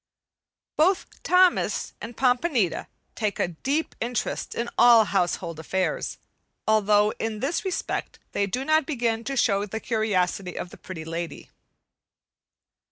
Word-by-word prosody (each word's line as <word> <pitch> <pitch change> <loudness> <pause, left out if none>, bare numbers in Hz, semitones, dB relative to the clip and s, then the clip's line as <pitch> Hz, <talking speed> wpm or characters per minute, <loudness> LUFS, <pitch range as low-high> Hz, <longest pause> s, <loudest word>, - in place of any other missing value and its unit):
Both 365 +5 +1
Thomas 365 -1 +3
and 230 0 -8
Pompanita 250 - +1 0.3
take 210 -2 -2
a - - 0
deep 275 - -2
interest 240 0 -2
in 235 - -2
all 235 -2 +7
household 175 -4 -1
affairs, 185 +4 -2 0.5
although 210 -1 +4
in 220 -1 -2
this 285 +8 -1
respect 380 -3 -3
they 200 - 0
do 250 +7 -3
not 310 +1 +3
begin 235 -6 -1
to 275 0 -3
show 200 -4 +3
the 220 +3 -4
curiosity 195 -5 -1
of 180 - -5
the - - -12
Pretty 165 -4 -8
Lady. 165 +1 -5
220 Hz, 130 wpm, -25 LUFS, 190-260 Hz, 0.5 s, all